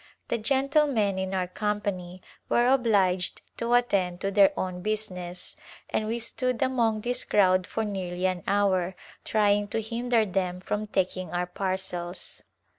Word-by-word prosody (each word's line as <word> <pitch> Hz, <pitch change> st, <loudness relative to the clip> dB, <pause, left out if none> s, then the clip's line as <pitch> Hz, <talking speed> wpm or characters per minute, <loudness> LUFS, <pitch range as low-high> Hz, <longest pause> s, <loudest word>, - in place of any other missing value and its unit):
The 235 Hz, -, 0 dB
gentlemen 265 Hz, -5 st, +2 dB
in 190 Hz, 0 st, -2 dB
our 185 Hz, -1 st, +1 dB
company 185 Hz, -2 st, -3 dB, 0.3 s
were 240 Hz, -, +3 dB
obliged 205 Hz, -8 st, +2 dB
to 235 Hz, +1 st, +1 dB
attend 190 Hz, -7 st, +1 dB
to 195 Hz, -, -1 dB
their 200 Hz, -1 st, +6 dB
own 180 Hz, -1 st, -3 dB
business 185 Hz, -4 st, -3 dB, 0.4 s
and 215 Hz, -, 0 dB
we 230 Hz, +2 st, -1 dB
stood 250 Hz, +2 st, -1 dB
among 230 Hz, -5 st, +1 dB
this 245 Hz, +3 st, -1 dB
crowd 185 Hz, -2 st, +3 dB
for 225 Hz, -, -2 dB
nearly 185 Hz, -3 st, -3 dB
an 185 Hz, -1 st, 0 dB
hour 190 Hz, -2 st, +2 dB, 0.3 s
trying 205 Hz, -1 st, +2 dB
to 220 Hz, -, -1 dB
hinder 230 Hz, +1 st, +1 dB
them 185 Hz, -2 st, -1 dB
from 210 Hz, +3 st, -3 dB
taking 185 Hz, -2 st, -1 dB
our 180 Hz, 0 st, -1 dB
parcels. 185 Hz, -1 st, -4 dB
200 Hz, 145 wpm, -27 LUFS, 185-225 Hz, 0.4 s, their